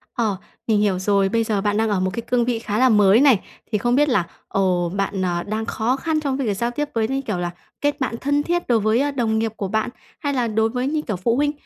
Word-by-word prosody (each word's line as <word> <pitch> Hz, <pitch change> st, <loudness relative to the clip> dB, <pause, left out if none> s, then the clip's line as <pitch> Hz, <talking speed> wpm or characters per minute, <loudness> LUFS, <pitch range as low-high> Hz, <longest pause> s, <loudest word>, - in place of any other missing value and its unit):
Ờ. 215 Hz, -5 st, 0 dB, 0.3 s
Mình 215 Hz, -2 st, +3 dB
hiểu 195 Hz, -3 st, +1 dB
rồi. 195 Hz, 0 st, +2 dB
Bây 230 Hz, +1 st, +1 dB
giờ 210 Hz, -3 st, -1 dB
bạn 205 Hz, +1 st, 0 dB
đang 220 Hz, 0 st, +1 dB
ở 200 Hz, -3 st, +1 dB
một 185 Hz, 0 st, +1 dB
cái 235 Hz, -, -3 dB
cương 240 Hz, 0 st, 0 dB
vị 240 Hz, -2 st, 0 dB
khá 210 Hz, -2 st, -3 dB
là 255 Hz, +1 st, +5 dB
mới 210 Hz, 0 st, +5 dB
này. 265 Hz, -9 st, +6 dB, 0.3 s
Thì 210 Hz, -, +2 dB
không 240 Hz, +4 st, +1 dB
biết 295 Hz, +1 st, +3 dB
là, 200 Hz, -8 st, +2 dB, 0.2 s
ồ, 180 Hz, -3 st, +1 dB
bạn, 195 Hz, 0 st, -2 dB
ờ, 175 Hz, -1 st, -1 dB
đang 215 Hz, +2 st, -3 dB
khó 230 Hz, +4 st, 0 dB
khăn 315 Hz, +2 st, -1 dB
trong 275 Hz, -3 st, -1 dB
cái 265 Hz, -5 st, -2 dB
việc 205 Hz, -, +1 dB
giao 235 Hz, +2 st, -1 dB
tiếp 295 Hz, +4 st, -2 dB
với, 220 Hz, -1 st, +1 dB
như 270 Hz, 0 st, -1 dB
kiểu 210 Hz, -8 st, -3 dB
là, 175 Hz, 0 st, -2 dB, 0.3 s
kết 290 Hz, 0 st, 0 dB
bạn 255 Hz, -3 st, -1 dB
thân 285 Hz, +1 st, +1 dB
thiết 345 Hz, 0 st, -1 dB
đối 235 Hz, -3 st, +3 dB
với, 215 Hz, +3 st, +2 dB
ơ, 290 Hz, +1 st, +1 dB
đồng 225 Hz, -5 st, 0 dB
nghiệp 225 Hz, -1 st, -1 dB
của 195 Hz, -, -3 dB
bạn, 220 Hz, +4 st, 0 dB, 0.3 s
hay 285 Hz, -3 st, -1 dB
là 245 Hz, -3 st, 0 dB
đối 220 Hz, +1 st, +1 dB
với, 250 Hz, +2 st, -2 dB
như 305 Hz, +1 st, 0 dB
kiểu, 215 Hz, -9 st, -3 dB
phụ 230 Hz, +6 st, 0 dB
huynh? 290 Hz, +2 st, +2 dB
225 Hz, 285 wpm, -22 LUFS, 205-260 Hz, 0.3 s, này